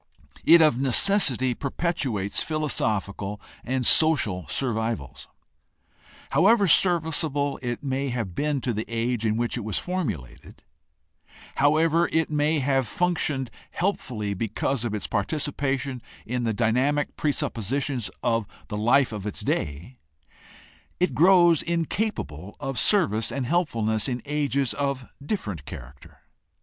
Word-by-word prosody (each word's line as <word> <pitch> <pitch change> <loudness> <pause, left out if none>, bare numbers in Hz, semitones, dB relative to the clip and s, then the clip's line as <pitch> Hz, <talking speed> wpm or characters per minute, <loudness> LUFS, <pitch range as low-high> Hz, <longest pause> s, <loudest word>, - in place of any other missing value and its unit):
It 170 -1 +7
of 150 -6 +3
necessity 135 - +3
perpetuates 130 - -1
philosophical 105 -10 -2 0.2
and 130 0 -1
social 115 - +3
survivals. 110 - -2 1.0
However 200 +8 +4
serviceable 160 -5 +2
it 120 0 -4
may 135 0 -1
have 115 -7 -3
been 145 +4 -1
to 120 - -1
the 110 +1 -3
age 115 0 -1
in 110 0 0
which 120 +1 -1
it 120 - -4
was 105 -1 -2
formu 180 - -1
lated; 65 -2 -15 1.0
however 160 +4 +3
it 160 -1 +1
may 150 +1 +2
have 135 -2 +1
functioned 150 -5 -1 0.2
helpfully 125 - -2
because 115 +5 -2
of 115 -3 -2
its 105 - -4
participation 135 +1 -2 0.2
in 125 +1 -2
the 115 - +1
dynamic 130 +6 +1
presuppositions 135 -3 -1
of 115 -3 +1 0.2
the 105 - -3
life 120 +5 +3
of 105 -2 -5
its 105 - -5
day, 85 - -3 1.0
it 180 - +1
grows 175 -2 +5
incapable 165 - -3
of 135 -2 -3
service 150 - +2
and 130 +1 -2
helpfulness 115 - 0
in 125 -1 -3
ages 140 -3 0
of 140 -2 -2 0.2
different 105 - -4
character. 65 +2 -11
130 Hz, 125 wpm, -25 LUFS, 110-155 Hz, 1.0 s, It